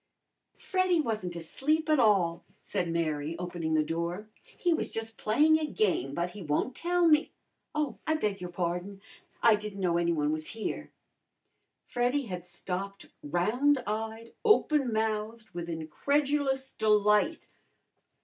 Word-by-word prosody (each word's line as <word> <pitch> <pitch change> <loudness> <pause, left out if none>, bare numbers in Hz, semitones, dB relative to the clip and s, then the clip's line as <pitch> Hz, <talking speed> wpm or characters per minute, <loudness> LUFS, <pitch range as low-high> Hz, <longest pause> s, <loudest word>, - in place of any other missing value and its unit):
"Freddy 370 -2 +1
wasn't 215 - -2
asleep 300 - -1
at 305 -2 +4
all," 185 -7 +3 0.2
said 175 - -2
Mary, 160 -1 -1
opening 170 -2 -2
the 155 - +4
door. 170 +6 -3 0.3
"He 350 -2 +2
was - - -1
just 225 0 -4
playing 305 +9 +4
a 310 - -1
game, 180 - 0
but 175 +1 -1
he 205 - -9
won't 155 - 0
tell 350 +2 +2
me 305 -1 +4 0.4
Oh, 300 -3 -1
I 315 - +3
beg 210 -10 -1
your 180 - -5
pardon! 180 +3 -3 0.4
I 230 - +7
didn't 210 -1 -3
know 175 -3 +2
any 170 0 +2
one 150 -2 +1
was 155 0 -3
here." 220 - -4 1.0
Freddy 245 +4 0
had 180 -6 -6
stopped 190 +3 -5 0.2
round 240 - +2
eyed, 220 +2 -4
open 305 - +4
mouthed 220 0 -2
with 170 0 -5
incredulous 270 - 0
delight. 210 +7 +2
210 Hz, 140 wpm, -29 LUFS, 175-270 Hz, 1.0 s, I